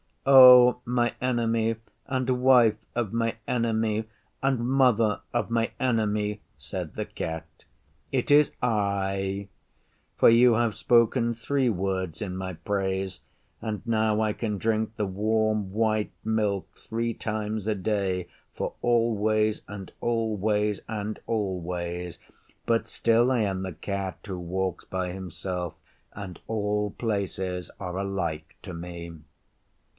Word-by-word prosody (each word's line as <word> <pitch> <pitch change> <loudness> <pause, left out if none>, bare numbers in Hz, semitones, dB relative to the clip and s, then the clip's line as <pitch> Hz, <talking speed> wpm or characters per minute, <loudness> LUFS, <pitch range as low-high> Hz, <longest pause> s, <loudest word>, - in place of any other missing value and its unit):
'O 125 -2 +9
my 120 -1 +1
Enemy 115 -2 +1 0.3
and 130 -2 -1
Wife 120 -5 +6 0.2
of 115 -3 -1
my 115 -1 0
Enemy 110 -2 0 0.4
and 135 -2 +1
Mother 120 -4 +3
of - - -1
my 115 0 +1
Enemy, 105 -4 0 0.2
said - - -6
the - - -2
Cat, 80 0 -5 0.7
'it - - 0
is 145 0 +6
I; 100 -3 0 0.7
for - - +7
you 120 +1 +6
have 115 -1 +2
spoken 120 +1 +3
three 130 +2 0
words 95 -4 -2
in 95 -3 -3
my 95 0 -4
praise, 95 0 -2 0.4
and 110 -1 -4
now 110 -2 +2
I 110 -1 +1
can 105 -2 -3
drink 110 +1 0
the 105 - -1
warm 110 +1 0
white 110 0 +1
milk 105 -3 0
three 115 +1 -3
times 110 -1 -3
a 110 - +1
day 95 -3 -1 0.3
for - - -3
always 110 -2 +2
and 100 -2 -8
always 105 -3 0
and 105 -1 -4
always. 90 -4 -3 0.5
But 115 -1 +1
still 115 +2 +2
I 125 -3 +2
am 95 -3 -1
the 95 -1 -4
Cat 95 +2 -4
who 95 -4 -5
walks 90 +1 -2
by 95 -1 -3
himself, 90 -1 -5 0.4
and 95 -4 -8
all 105 -1 -1
places 95 -5 -3
are 90 -1 -4
alike 85 -5 -3
to 95 - -7
me. 85 0 -7
105 Hz, 130 wpm, -27 LUFS, 95-115 Hz, 0.7 s, O